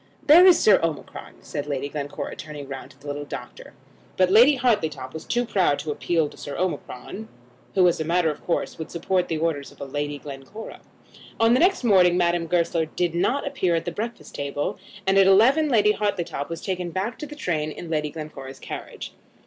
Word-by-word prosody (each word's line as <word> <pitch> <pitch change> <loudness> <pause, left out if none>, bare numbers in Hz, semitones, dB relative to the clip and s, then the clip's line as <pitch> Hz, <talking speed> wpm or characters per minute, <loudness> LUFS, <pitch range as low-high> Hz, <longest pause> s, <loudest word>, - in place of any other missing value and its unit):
"There 340 +5 +8
is 365 - +8
Sir 205 -3 +5
Omicron," 165 -3 -4
said 145 0 -5
Lady 140 -1 -2
Glencora, 145 0 -5
turning 150 -2 -8
round 135 -1 -7
to 135 - -20
the 140 - -19
little 145 0 -4
doctor. 145 - -9 0.4
But 185 0 +3
Lady 245 +8 +7
Hartletop 160 - 0
was 160 - -7
too 240 +1 0
proud 190 -10 +2
to 155 - -4
appeal 165 +1 0
to - - -14
Sir 145 - -7
Omicron, 180 - -4 0.5
who, 185 -2 +5
as 170 - +1
a - - 0
matter 170 0 +2
of 150 - -10
course, 170 - -2
would 160 - -5
support 180 +2 0
the 160 - -2
orders 155 -3 -2
of - - -19
Lady 145 +1 -3
Glencora. 140 +10 -9 0.6
On 225 +1 +5
the 250 - +4
next 370 -2 +3
morning 185 -6 +5
Madame 170 -1 +1
Goesler 170 -1 +1
did 175 +1 -1
not 245 +11 0
appear 265 -12 0
at 165 - -2
the 175 - -2
breakfast 230 +6 -6
table, 140 0 -3 0.3
and 195 +1 +4
at 195 - +6
eleven 260 +11 +5
Lady 210 -4 +4
Hartletop 185 -9 -2
was 165 - -5
taken 180 -2 -2
back 190 +7 -3
to 300 - -5
the 295 - -9
train 155 - -2
in 165 +2 -8
Lady 150 -1 0
Glencora's 140 -4 -8
carriage. - - -8
170 Hz, 200 wpm, -24 LUFS, 150-210 Hz, 0.6 s, There